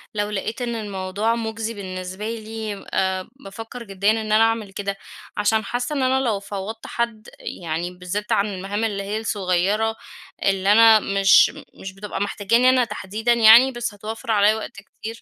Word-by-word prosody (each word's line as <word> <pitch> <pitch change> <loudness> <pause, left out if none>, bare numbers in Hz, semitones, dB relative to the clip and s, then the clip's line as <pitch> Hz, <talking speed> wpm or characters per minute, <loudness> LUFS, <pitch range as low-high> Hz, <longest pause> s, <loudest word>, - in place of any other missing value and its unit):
لو 205 0 -1
لقيت 215 +4 -4
إن 235 -1 -2
الموضوع 205 +1 -2
مجزي 225 0 -4
بالنسبة 185 0 -6
لي 220 -2 -6
آآ 190 -1 0
بافكّر 225 0 -9
جديًا 200 0 +1
إن 225 - 0
أنا 215 +1 +5
أعمل 225 -3 0
كده، 200 0 -4 0.4
عشان 220 +1 +2
حاسّة 245 +7 -3
إن 275 - 0
أنا 260 +1 +2
لو 230 -6 0
فوّضت 205 +2 -7
حد 235 -2 -3
يعني 170 +1 -4
بالذات 180 +3 -5
عن 200 - +3
المهام 195 +3 -3
اللي 205 -3 -1
هي 205 +2 -3
الصغيّرة 205 +1 0 0.5
اللي 195 0 +2
أنا 225 0 +7
مش 195 -1 +5 0.2
مش 190 0 -9
بتبقى 195 0 -6
محتاجاني 215 +5 +2
أنا 255 -1 +4
تحديدًا 215 +2 -1
يعني 235 +3 +7
بس 240 -3 -4
هتوفر 220 +2 -6
علىَّ 210 0 +4
وقت 220 - -6
كتير، 225 +3 -9
210 Hz, 165 wpm, -22 LUFS, 195-225 Hz, 0.5 s, أنا